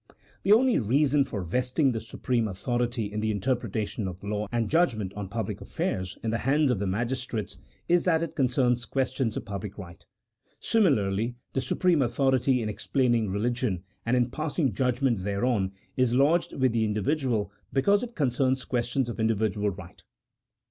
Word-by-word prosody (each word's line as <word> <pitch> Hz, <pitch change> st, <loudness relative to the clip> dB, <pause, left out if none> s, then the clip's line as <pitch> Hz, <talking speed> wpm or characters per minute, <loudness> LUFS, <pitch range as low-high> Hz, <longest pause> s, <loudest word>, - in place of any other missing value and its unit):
The 195 Hz, -, +1 dB
only 245 Hz, +3 st, +5 dB
reason 140 Hz, +5 st, +3 dB
for 100 Hz, -7 st, -4 dB
vesting 125 Hz, -, +1 dB
the 115 Hz, -, -2 dB
supreme 115 Hz, +1 st, -1 dB
authority 120 Hz, +2 st, -2 dB
in 105 Hz, -, -2 dB
the 110 Hz, 0 st, 0 dB
interpretation 110 Hz, -1 st, -1 dB
of 90 Hz, +1 st, -8 dB
law, 105 Hz, 0 st, -2 dB
and 115 Hz, -2 st, 0 dB
judgment 115 Hz, -, +1 dB
on 100 Hz, -2 st, -6 dB
public 110 Hz, 0 st, -4 dB
affairs 95 Hz, +2 st, -3 dB
in 110 Hz, -, 0 dB
the 115 Hz, -, -1 dB
hands 140 Hz, +2 st, +2 dB
of 115 Hz, -, 0 dB
the 100 Hz, -, -1 dB
magistrates, 120 Hz, +2 st, -3 dB, 0.3 s
is 175 Hz, 0 st, +3 dB
that 165 Hz, -2 st, +3 dB
it 170 Hz, -, -5 dB
concerns 125 Hz, -2 st, +1 dB
questions 130 Hz, -3 st, -1 dB
of -, -, -5 dB
public 100 Hz, -1 st, -6 dB
right. 85 Hz, -4 st, -10 dB, 0.6 s
Similarly 115 Hz, -, +2 dB, 0.2 s
the 135 Hz, -, 0 dB
supreme 175 Hz, +1 st, +2 dB
authority 130 Hz, 0 st, +2 dB
in -, -, -2 dB
explaining 120 Hz, 0 st, +1 dB
religion, 105 Hz, -2 st, -1 dB, 0.2 s
and 120 Hz, +2 st, +1 dB
in 120 Hz, 0 st, +1 dB
passing 155 Hz, -, -1 dB
judgment 125 Hz, 0 st, +1 dB
thereon, 100 Hz, 0 st, 0 dB, 0.2 s
is 125 Hz, -2 st, +2 dB
lodged 150 Hz, +6 st, +3 dB
with 130 Hz, -2 st, +2 dB
the 115 Hz, -1 st, +1 dB
individual 110 Hz, -, 0 dB, 0.2 s
because 200 Hz, +10 st, +3 dB
it 240 Hz, -1 st, -6 dB
concerns 130 Hz, -2 st, +1 dB
questions 125 Hz, +1 st, 0 dB
of 120 Hz, -, -6 dB
individual 110 Hz, -2 st, +1 dB
right. 95 Hz, -2 st, -10 dB
120 Hz, 160 wpm, -27 LUFS, 105-135 Hz, 0.6 s, only